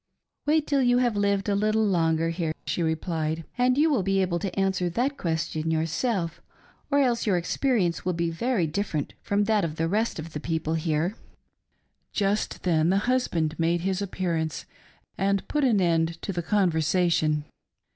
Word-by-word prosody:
" - - -58
Wait 305 0 +3
till 280 -2 +1
you 245 -1 +4
have 245 -3 +2
lived 200 -1 +1
a 205 - +2
little 215 +2 +2
longer 165 -4 +2
here," 165 -2 -2
she - - -2
replied, 160 0 -1
" - - -35
and 250 +1 +3
you 305 +2 +5
will 280 -9 +2
be 195 +1 +1
able 180 -2 0
to 195 0 -3
answer 190 -2 +1
that 250 +10 0
question 160 - -2
yourself, 165 +4 -1 0.5
or 285 - +2
else 240 -4 +1
your 190 -3 +3
experience 175 - 0
will 180 - 0
be 170 0 -1
very 215 +2 0
different 160 -2 -2
from 205 0 +1
that 210 -1 +2
of 155 -2 -2
the 165 +1 0
rest 215 +6 0
of 160 0 -7
the 150 - -3
people 160 0 -2
here." 160 +3 0 1.0
Just 205 +1 -1
then 165 -2 +2
the 190 - +3
husband 200 -9 0
made 170 +1 +1
his 190 +1 -1
appearance, 170 -5 -2 0.5
and 195 +1 +1
put 300 -1 0
an 235 -6 +3
end 165 -2 +1
to 195 - -3
the 175 - -2
conversation. 165 -4 +1
180 Hz, 180 wpm, -26 LUFS, 165-210 Hz, 1.0 s, you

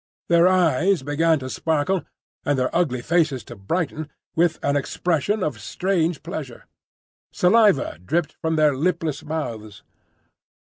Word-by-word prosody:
Their 170 +1 +5
eyes 185 -2 +3
began 160 +3 +2
to 130 -2 -6
sparkle, 160 +4 0 0.4
and 145 -2 +1
their 130 0 -1
ugly 135 -8 0
faces 155 -6 +1
to 120 - -10
brighten, 155 - -3 0.3
with 165 -1 +2
an 140 0 +1
expression 175 +7 0
of 130 -10 -3
strange 170 - -1
pleasure. 155 -7 -7 0.7
Saliva 195 - +3
dripped 155 - -1
from 160 0 0
their 150 -3 +3
lipless 160 -1 -1
mouths. 115 -10 -5
160 Hz, 130 wpm, -23 LUFS, 140-175 Hz, 0.7 s, Their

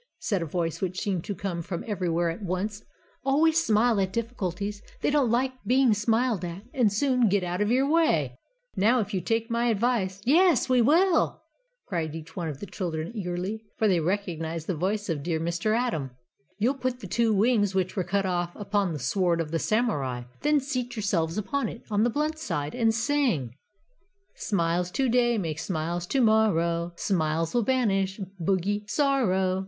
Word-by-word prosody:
said 200 -5 -1
a 165 - -3
voice 165 0 -2
which 185 -1 -2
seemed 185 -5 -1
to 205 - -4
come 175 -2 -3
from 170 +1 -5
everywhere 175 -5 0
at 170 - -8
once, 200 +3 -3 0.4
"always 315 +4 +3
smile 220 -1 +3
at 190 -1 -1
difficulties; 205 -3 -3 0.2
they - - +1
don't 285 -5 +3
like 255 +3 +2
being 255 -2 +4
smiled 220 -1 +1
at, 175 +3 -5
and 235 -6 +3
soon 250 +1 +2
get 195 -1 +2
out 180 +2 -2
of 210 - +1
your 260 +3 +3
way. 165 - +2 0.4
Now, 230 +6 +3
if 205 0 -5
you 185 - 0
take 225 +5 -1
my 235 +1 +1
advice 215 -4 0
" - - -24
"Yes, 330 +2 +4
we 255 -2 +4
will!" 330 +7 +3 0.4
cried 160 -4 -3
each 165 0 -9
of 160 -6 -4
the - - -6
children 175 -4 -4
eagerly, 190 +2 -3
for 220 - +2
they 185 -4 +3
recognised 165 -3 -2
the 185 - -1
voice 200 +6 -1
of 160 -5 -2
dear 160 +1 -1
Mr. 170 +7 0
Atom. 230 - -1 0.5
"You'll 230 +6 +2
put 255 -2 -3
the - - -9
two 235 -1 +1
wings 205 -2 +2
which 185 -1 0
were 190 - 0
cut 195 +3 0
off 175 -1 -1
upon 200 -3 -1
the - - -3
sword 170 +6 +1
of 160 -2 -3
the 165 - 0
Samurai, 145 - 0 0.2
then 300 0 +3
seat 255 -3 -3
yourselves 185 -6 0
upon 275 +7 -1
it 230 - -10
on 205 0 +2
the 235 - +3
blunt 305 +5 -1
side 150 - -3
and 230 -2 +2
sing: 225 - 0 0.8
"Smiles 175 -3 0
to 265 +8 0
day 240 -1 +3
Make 160 -6 -3
smiles 170 0 -3
to 270 - +1
morrow; 175 -7 +2
Smiles 165 -3 0
will 240 - +3
banish 205 -6 +1 0.2
Bogey 195 +4 0
Sorrow. 210 -9 +1
200 Hz, 185 wpm, -27 LUFS, 175-240 Hz, 0.8 s, being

